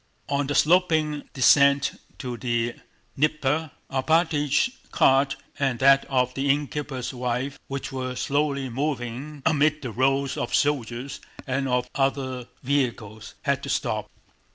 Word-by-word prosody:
On 140 -1 0
the 145 - -1
sloping 155 -3 +2
descent 140 +1 +4 0.2
to 125 -2 -5
the 120 -1 -1 0.4
Dnieper 150 +1 +1 0.2
Alpátych's 150 - +2 0.2
cart 135 +1 +4 0.2
and 135 -3 +1
that 135 +2 +5
of 125 -2 +1
the 135 +1 -1
innkeeper's 140 -2 -1
wife, 125 +2 -2
which 135 0 -5
were 130 -1 -4
slowly 140 +1 0
moving 135 +1 -4
amid 155 -1 +2
the 125 - -4
rows 135 +3 +1
of - - -1
soldiers 135 -2 -1 0.2
and 135 +1 -1
of 125 -1 0
other 135 -2 -1 0.2
vehicles, 115 -6 -2
had - - +1
to - - -6
stop. - - -1
135 Hz, 130 wpm, -25 LUFS, 125-145 Hz, 0.4 s, that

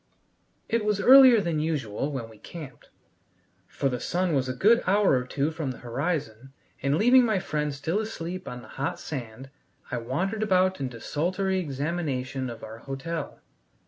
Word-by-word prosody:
It 230 -1 0
was 210 -1 +1
earlier 255 +1 +8
than 170 -4 -1
usual 145 -4 -2
when 130 -5 -4
we 110 -2 -16
camped, 155 -6 -10 0.8
for 140 - -2
the 125 -2 -2
sun 180 +5 0
was 130 -2 +1
a 130 - -3
good 230 - +4
hour 200 +1 +4
or 125 -1 +1
two 145 +4 -1
from 155 -4 -4
the 125 - -5
horizon, 135 -1 -3 0.3
and 140 +2 +1
leaving 245 +6 +6
my 220 -4 +2
friend 150 -4 -2
still 160 +8 -2
asleep 185 -4 -5
on 125 -2 -7
the - - -13
hot 170 +5 -2
sand, 130 -3 -7 0.4
I 125 - -1
wandered 185 - -2
about 185 -3 +2
in 135 -2 -2
desultory 180 - -1
examination 140 -4 -3
of 115 -1 -9
our 110 +1 -8
hotel. 140 +5 -5
150 Hz, 170 wpm, -27 LUFS, 130-185 Hz, 0.8 s, earlier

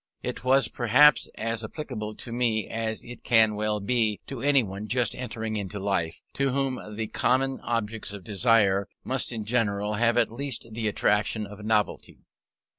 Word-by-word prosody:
It - - -4
was 135 +1 +4
perhaps 130 +5 +5
as 115 +1 -2
applicable 110 -4 -5
to 115 - -7
me 115 -3 0
as 110 -1 -3
it 120 0 -10
can 110 -2 +5
well 105 0 -1
be 110 0 +1
to 135 -4 -7
anyone 110 -8 +1
just 125 +1 +1
entering 115 -3 -4
into 100 0 -4
life, 95 -5 -2
to 140 0 +1
whom 135 -1 -1 0.2
the 110 +1 -2
common 130 +4 +1
objects 110 -2 -3
of 100 -2 -8
desire 100 -1 +3 0.2
must 130 0 -1
in 110 -3 -4
general 105 -3 0
have 115 +2 +2
at 115 -2 +3
least 135 0 -3
the 110 0 -2
attraction 105 +1 +1
of 105 +1 -10
novelty. 105 -1 -1
110 Hz, 165 wpm, -27 LUFS, 105-125 Hz, 0.2 s, perhaps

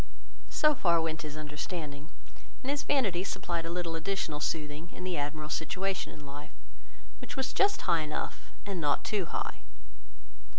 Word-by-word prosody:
So 305 0 +5
far 170 - +4
went 160 0 0
his 150 -1 -5
understanding; 150 0 -4 0.5
and 265 - +1
his 285 0 +1
vanity 205 -12 +3
supplied 170 -3 -1
a - - -2
little 170 -1 -1
additional 165 -3 0
soothing, 150 +1 -1
in 180 - -7
the 185 -1 0
Admiral's 150 0 -1
situation 190 +5 0
in 150 -1 -10
life, 145 +1 -8 0.6
which - - -6
was 265 0 0
just 400 0 +4
high 170 -3 +4
enough, 155 0 -3
and 195 -4 -2
not 145 -2 +3
too 205 -4 +1
high. - - -2
165 Hz, 160 wpm, -32 LUFS, 150-190 Hz, 0.6 s, So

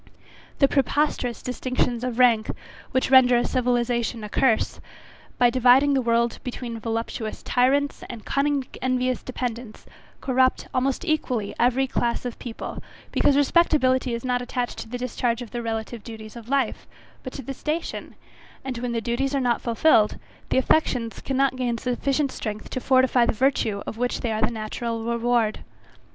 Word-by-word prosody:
The 275 - +5
preposterous 275 -3 0
distinctions 250 -1 -1
of 250 -2 -3
rank, 235 -4 +4 0.4
which 260 0 0
render 250 -2 +6
civilization 240 -2 0
a 210 - -6
curse, 230 0 +1 0.6
by 245 -1 +4
dividing 255 +3 +5
the 270 - +2
world 235 -1 +1
between 240 -2 -5
voluptuous 225 0 -4
tyrants, 275 +3 +1
and 230 -3 -8
cunning 280 -1 0 0.2
envious 255 0 0
dependents, 245 -3 -5 0.3
corrupt, 260 -1 +1
almost 265 +6 0
equally, 255 - -1
every 255 +2 +3
class 240 -2 -1
of 245 - -5
people, 235 -2 -6 0.3
because 280 - +3
respectability 265 -5 +3
is 235 - -6
not 250 -1 0
attached 245 0 -3
to 225 - -7
the 245 - -4
discharge 245 -1 -1
of 230 - -12
the 240 - -3
relative 225 0 -4
duties 220 -1 -9
of 235 0 -10
life, 270 -5 0 0.3
but 255 - -7
to 275 - -7
the 275 - -5
station, 310 +5 -4 0.5
and 255 -3 -4
when 245 0 -3
the 230 - -1
duties 255 +5 -1
are - - +2
not 245 -2 +1
fulfilled, 230 -2 +3 0.3
the - - +1
affections 250 -4 +1
cannot 270 0 +1
gain 245 -2 -1
sufficient 270 +3 0
strength 215 -3 -6
to 255 - -3
fortify 260 -2 +4
the - - +1
virtue 225 -4 +1
of 225 - -6
which 245 0 -1
they 235 - -1
are 215 0 -1
the 220 - +3
natural 230 +1 -4
reward. 235 -1 +1
245 Hz, 160 wpm, -24 LUFS, 235-260 Hz, 0.6 s, render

